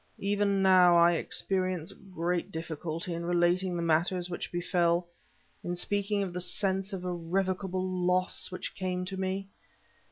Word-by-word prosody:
Even 200 -1 +1
now 180 -2 +6
I 170 0 +6
experience 185 0 -1
great 180 -1 -3
difficulty 165 +1 -4
in 170 0 -4
relating 175 +1 +2
the 170 - -2
matters 175 +2 +1
which 175 - -4
befell, 175 0 +1 0.6
in 175 - -2
speaking 200 +2 0
of 185 -3 -5
the 180 - -3
sense 190 +2 +1
of 190 -2 -5
irrevocable 185 +2 -1
loss 180 0 0
which 185 - -5
came 180 -1 -3
to 190 +1 -5
me. 190 +1 -2
180 Hz, 140 wpm, -29 LUFS, 175-190 Hz, 0.6 s, now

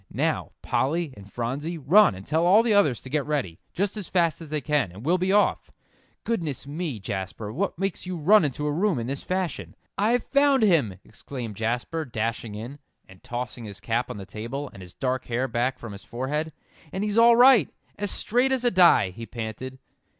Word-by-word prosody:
"Now, - - -1
Polly 160 +1 0
and 100 -1 -14
Phronsie, 140 +8 -3
run 175 - +5
and 95 +1 -10
tell 160 +2 +1
all 195 +6 +6
the 230 -2 +2
others 150 - +3
to 130 - -10
get 150 -1 +1
ready, 135 - -2
just 200 +3 -1
as 205 - -4
fast 170 -4 +1
as 160 - -9
they 150 0 -1
can, 145 - 0
and 100 +7 -11
we'll 180 +3 +2
be 185 +1 +1
off. 205 +1 +2 0.5
Goodness 165 - -2
me, 145 -4 -4
Jasper, 95 +2 -5
what 190 - -2
makes 195 0 -3
you 185 -1 -3
run 190 +6 +5
into 150 0 -2
a 150 - 0
room 180 +2 +1
in 115 - -3
this 140 +3 -3
fashion?" 165 - -3 0.2
"I've 230 +4 +2
found 280 -2 +3
him!" 155 - +3
exclaimed 115 0 -8
Jasper, 120 +9 -2
dashing 115 -4 -3
in, 120 +7 -7 0.3
and 95 -1 -17
tossing 120 -1 -5
his 100 -2 -9
cap 115 +4 -1
on - - -6
the 100 - -7
table, 120 +8 -6
and 95 - -11
his 90 -1 -12
dark 130 -1 -2
hair 125 +2 -1
back 120 +2 -1
from 115 - -8
his 100 0 -10
forehead. 150 +6 -3 0.4
"And 190 - -3
he's 210 +1 +1
all 235 0 +7
right 250 0 +6 0.3
as 205 0 -2
straight 245 +7 +1
as 260 -2 +1
a 240 - +4
die," 175 - +5
he 115 +5 -9
panted. 120 +3 -6
145 Hz, 205 wpm, -25 LUFS, 115-185 Hz, 0.5 s, all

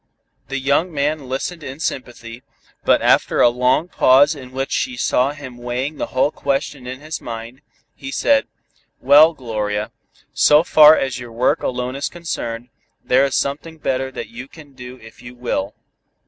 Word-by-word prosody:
The 135 +2 -3
young 140 +6 +1
man 145 -2 -2
listened 160 +6 -4
in 135 0 -8
sympathy, 120 -6 -5 0.4
but - - +3
after - - +2
a 120 - +6
long 125 +6 +1
pause 140 -2 +4
in 130 -4 -11
which 135 +1 -4
she 255 -1 -2
saw 130 - +1
him 135 -4 -10
weighing 125 +5 -4
the - - -3
whole 135 +3 +1
question 140 -2 -3
in 130 +2 -7
his 155 +1 -6
mind, 115 +3 -8 0.3
he 135 - -9
said: 275 - +2 0.5
"Well, 150 +5 +6
Gloria, 105 -4 -3 0.4
so 150 +2 +5
far 155 -2 +7
as 135 -2 -2
your 120 -1 -9
work 120 +3 +1
alone 125 +1 -3
is 140 - -3
concerned, 125 -8 -5 0.3
there 135 +2 +3
is 135 - -2
something 150 +4 -3
better 130 -3 -2
that 130 - -7
you 120 +3 -9
can 145 -1 -15
do 125 0 -10
if 110 -2 -16
you 120 +1 -11
will. 105 -5 -3
130 Hz, 170 wpm, -19 LUFS, 125-145 Hz, 0.5 s, far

